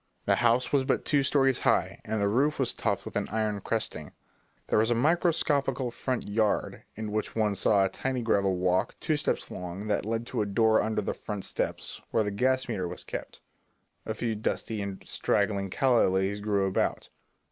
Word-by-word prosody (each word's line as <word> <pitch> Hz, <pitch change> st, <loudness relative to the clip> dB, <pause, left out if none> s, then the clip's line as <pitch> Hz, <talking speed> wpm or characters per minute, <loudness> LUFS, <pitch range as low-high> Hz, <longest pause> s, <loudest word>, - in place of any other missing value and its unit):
The -, -, +3 dB
house 120 Hz, +3 st, +2 dB
was 140 Hz, -2 st, +4 dB
but 130 Hz, -, 0 dB
two 145 Hz, -2 st, +3 dB
stories 135 Hz, -1 st, +3 dB
high, -, -, +1 dB
and 110 Hz, 0 st, -2 dB
the 100 Hz, -, +2 dB
roof 140 Hz, +8 st, +2 dB
was 135 Hz, -, +1 dB
topped -, -, -1 dB
with -, -, -8 dB
an -, -, 0 dB
iron 105 Hz, -1 st, -1 dB
cresting. 95 Hz, -9 st, -3 dB, 0.5 s
There -, -, +2 dB
was 110 Hz, +2 st, +2 dB
a 120 Hz, -, +3 dB
microscopical 140 Hz, -3 st, +2 dB
front 130 Hz, +1 st, -3 dB
yard 105 Hz, 0 st, 0 dB
in 110 Hz, 0 st, -5 dB
which 110 Hz, 0 st, -2 dB
one 105 Hz, -2 st, +2 dB
saw 100 Hz, 0 st, +3 dB
a -, -, 0 dB
tiny 130 Hz, +2 st, -3 dB
gravel 100 Hz, -4 st, +2 dB
walk, 90 Hz, 0 st, +1 dB
two 155 Hz, -, 0 dB
steps 150 Hz, -, -1 dB
long, 90 Hz, +3 st, -6 dB
that 105 Hz, -, +1 dB
led 115 Hz, +2 st, -2 dB
to -, -, -2 dB
a 105 Hz, -, -1 dB
door 110 Hz, +2 st, +3 dB
under 110 Hz, -1 st, -1 dB
the -, -, -2 dB
front 105 Hz, -3 st, -6 dB
steps, -, -, -4 dB
where 110 Hz, -, +2 dB
the 105 Hz, -, -2 dB
gas 130 Hz, +5 st, +1 dB
meter 95 Hz, -7 st, -2 dB
was -, -, -7 dB
kept. -, -, -7 dB, 0.6 s
A 110 Hz, -, -4 dB
few 115 Hz, 0 st, -1 dB
dusty 110 Hz, 0 st, -2 dB
and 100 Hz, -1 st, -6 dB
straggling 100 Hz, -1 st, 0 dB
calla 125 Hz, +4 st, +3 dB
lilies 95 Hz, +2 st, 0 dB
grew 100 Hz, -2 st, +1 dB
about. 95 Hz, -, -1 dB
110 Hz, 195 wpm, -28 LUFS, 100-125 Hz, 0.6 s, was